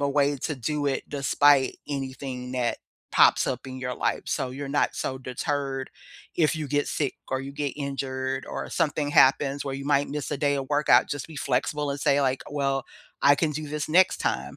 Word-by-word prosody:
a 140 - +1
way 140 0 +2
to 150 +4 -3
do 145 +3 -2
it 135 - -1
despite 140 -1 +3
anything 130 -2 -5
that 125 -2 -1 0.3
pops - - +5
up 125 - -3
in 130 0 -7
your 125 -1 -3
life, - - -1
so 130 - -1
you're 140 +2 -6
not 145 +1 +1
so 130 - -3
deterred 135 +1 -3 0.5
if 160 -1 +2
you 155 -1 -3
get 145 +1 0
sick 145 -4 -1
or 130 - -1
you 135 +1 -7
get 145 0 -2
injured 135 -2 -3
or - - -5
something 150 -1 0
happens 140 0 +4
where 135 - -3
you 135 - -6
might 145 0 +2
miss 145 -1 -4
a 145 - 0
day 145 0 +2
of 135 -1 -4
workout, 150 0 +4
just 145 -3 -4
be 160 - -10
flexible 140 +3 -1
and 140 - -6
say, 145 -1 +3
like, 130 -1 0
"Well, 135 -2 -1 0.4
I 145 0 +6
can 155 0 0
do 155 0 -5
this 150 -1 -3
next 180 +4 +5
time. - - -2
140 Hz, 205 wpm, -26 LUFS, 130-145 Hz, 0.5 s, I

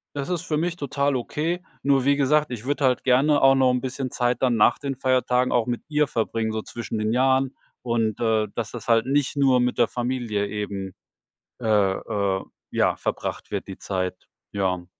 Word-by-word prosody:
Das 140 +2 -3
ist 175 -3 -1
für 165 -4 -2
mich 170 +2 -1
total 140 -2 -1
okay. 160 +8 -2 0.2
Nur, 140 -2 +3
wie 140 +2 +3
gesagt, 145 +1 +2
ich 120 -1 -6
würde 145 +1 -1
halt 125 -1 +2
gerne 140 +3 +3
auch 135 0 +7
noch 130 -1 +4
'n 125 - +1
bisschen 130 0 -3
Zeit 120 0 0
dann 125 -2 +3
nach 105 - +4
den 140 -2 -3
Feiertagen 125 -1 +1
auch 120 -1 +2
mit 120 -1 -3
ihr 150 -1 +2
verbringen, 115 -2 -1
so 110 0 -3
zwischen 115 -1 -5
den 110 +1 0
Jahren. 130 +1 +2 0.3
Und, 115 -3 0
äh, 110 -2 +1
dass 115 -3 -3
das 120 -1 -8
halt 115 -1 +4
nicht 140 +1 +1
nur 135 -2 +4
mit 125 0 0
der 120 - +4
Familie 120 -5 -2
eben 100 -2 -5 0.7
äh 105 -4 +3
äh, 100 -2 -1 0.3
ja, - - +1
verbracht - - -4
wird - - -3
die - - -8
Zeit. 90 -1 -4 0.2
Ja. 90 -3 -1
125 Hz, 195 wpm, -24 LUFS, 110-140 Hz, 0.7 s, auch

